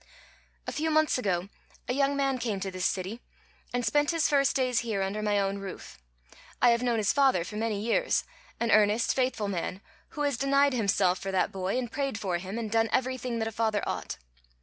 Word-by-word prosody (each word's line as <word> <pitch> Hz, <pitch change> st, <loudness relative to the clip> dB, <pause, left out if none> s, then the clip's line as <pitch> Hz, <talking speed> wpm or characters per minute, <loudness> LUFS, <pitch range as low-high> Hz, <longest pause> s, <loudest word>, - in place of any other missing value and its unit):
"A -, -, -3 dB
few 320 Hz, +1 st, -1 dB
months 310 Hz, -3 st, +3 dB
ago 185 Hz, -5 st, -1 dB, 0.4 s
a 250 Hz, -, 0 dB
young 280 Hz, +1 st, +1 dB
man 270 Hz, -2 st, +1 dB
came 220 Hz, -5 st, -2 dB
to 195 Hz, 0 st, -3 dB
this 185 Hz, 0 st, 0 dB
city, 195 Hz, +6 st, -4 dB, 0.5 s
and 245 Hz, -1 st, -1 dB
spent 295 Hz, 0 st, +2 dB
his 330 Hz, -2 st, +2 dB
first 275 Hz, -2 st, +2 dB
days 255 Hz, -3 st, +2 dB
here 215 Hz, -5 st, -1 dB
under 200 Hz, +2 st, -2 dB
my 210 Hz, -1 st, +1 dB
own 195 Hz, 0 st, -1 dB
roof. 195 Hz, -, -9 dB, 0.6 s
I 245 Hz, -, +6 dB
have 235 Hz, 0 st, +2 dB
known 240 Hz, -2 st, +1 dB
his 210 Hz, -2 st, +2 dB
father 270 Hz, -11 st, +3 dB
for 210 Hz, -, -8 dB
many 215 Hz, -1 st, -1 dB
years, 235 Hz, -, +1 dB, 0.4 s
an 235 Hz, -1 st, 0 dB
earnest, 215 Hz, +2 st, +4 dB
faithful 255 Hz, -5 st, 0 dB
man, 185 Hz, -1 st, -3 dB, 0.4 s
who -, -, -2 dB
has 285 Hz, -4 st, 0 dB
denied 275 Hz, +2 st, +3 dB
himself 195 Hz, -5 st, +2 dB
for 195 Hz, -, -4 dB
that 185 Hz, -1 st, +1 dB
boy, 190 Hz, +4 st, -2 dB
and 245 Hz, -2 st, -3 dB
prayed 275 Hz, -5 st, -2 dB
for 185 Hz, -5 st, -1 dB
him, 190 Hz, +4 st, -6 dB
and 225 Hz, -3 st, -4 dB
done 225 Hz, 0 st, +2 dB
everything 255 Hz, -2 st, -1 dB
that 225 Hz, -1 st, -1 dB
a -, -, -3 dB
father 220 Hz, -2 st, 0 dB
ought. -, -, -4 dB
225 Hz, 210 wpm, -28 LUFS, 200-260 Hz, 0.6 s, I